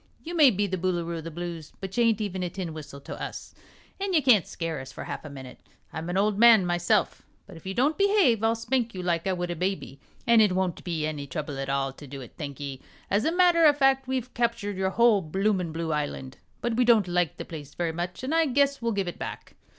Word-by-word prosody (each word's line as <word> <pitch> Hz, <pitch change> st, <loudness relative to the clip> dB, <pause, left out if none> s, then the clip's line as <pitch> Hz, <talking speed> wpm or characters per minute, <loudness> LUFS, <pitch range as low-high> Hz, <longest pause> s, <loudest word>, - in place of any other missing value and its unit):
You 335 Hz, -, -6 dB
may 300 Hz, -5 st, +7 dB
be 205 Hz, -2 st, 0 dB
the 185 Hz, -2 st, -3 dB
Boolooroo 170 Hz, -2 st, -1 dB
of 160 Hz, -, -10 dB
the -, -, -4 dB
Blues, 170 Hz, -2 st, -7 dB
but 195 Hz, -1 st, -6 dB
you 240 Hz, -, +3 dB
ain't 225 Hz, -2 st, +2 dB
even 190 Hz, -3 st, -3 dB
a 180 Hz, -, -1 dB
tin 175 Hz, -2 st, -5 dB
whistle 150 Hz, -3 st, -9 dB
to -, -, -8 dB
us, -, -, -7 dB, 0.5 s
an' 390 Hz, -1 st, -2 dB
you 310 Hz, -4 st, +3 dB
can't 220 Hz, -, +5 dB
skeer 165 Hz, -4 st, -4 dB
us 135 Hz, 0 st, -10 dB
for -, -, -8 dB
half -, -, -6 dB
a 155 Hz, -, -8 dB
minute. 130 Hz, -2 st, -10 dB, 0.3 s
I'm 160 Hz, +2 st, -5 dB
an 180 Hz, -, -1 dB
ol' 205 Hz, +2 st, +3 dB
man, 220 Hz, -1 st, +6 dB
myself, 175 Hz, +4 st, +1 dB, 0.2 s
but 195 Hz, -, -13 dB
if 165 Hz, +3 st, -11 dB
you 190 Hz, -, -4 dB
don't 285 Hz, +8 st, +1 dB
behave 395 Hz, -, +4 dB
I'll 225 Hz, +1 st, +3 dB
spank 230 Hz, -1 st, -1 dB
you 180 Hz, -, -4 dB
like 170 Hz, 0 st, 0 dB
I 190 Hz, -, +2 dB
would 175 Hz, -1 st, -3 dB
a -, -, -3 dB
baby, 180 Hz, -7 st, -3 dB, 0.3 s
an' 235 Hz, -1 st, +6 dB
it 210 Hz, -4 st, +4 dB
won't 185 Hz, -2 st, -1 dB
be 165 Hz, -4 st, -2 dB
any 150 Hz, -2 st, -4 dB
trouble 145 Hz, +1 st, -5 dB
at 135 Hz, 0 st, -3 dB
all 135 Hz, -1 st, 0 dB
to 145 Hz, +1 st, -12 dB
do 135 Hz, +1 st, -8 dB
it, 125 Hz, -, -11 dB
thank'e. 140 Hz, -2 st, -6 dB, 0.3 s
As 205 Hz, +3 st, +2 dB
a 320 Hz, -, +2 dB
matter 350 Hz, -1 st, +4 dB
o' 295 Hz, -, +6 dB
fact, 270 Hz, -2 st, +2 dB
we've 255 Hz, -1 st, -3 dB
captured 230 Hz, -4 st, -1 dB
your 190 Hz, 0 st, 0 dB
whole 230 Hz, 0 st, +4 dB
bloomin' 190 Hz, +1 st, 0 dB
blue 160 Hz, 0 st, -2 dB
island, 145 Hz, -3 st, -4 dB, 0.2 s
but 240 Hz, -1 st, -1 dB
we 250 Hz, -, +4 dB
don't 230 Hz, -5 st, +4 dB
like 175 Hz, -3 st, 0 dB
the -, -, -6 dB
place 145 Hz, -4 st, -9 dB
very 170 Hz, -2 st, -1 dB
much, 175 Hz, +6 st, -5 dB
and 270 Hz, +4 st, -2 dB
I 325 Hz, -1 st, +3 dB
guess 280 Hz, +1 st, +2 dB
we'll 230 Hz, -1 st, 0 dB
give 195 Hz, -2 st, -1 dB
it 175 Hz, -, -6 dB
back. -, -, -7 dB
185 Hz, 250 wpm, -27 LUFS, 160-235 Hz, 0.5 s, may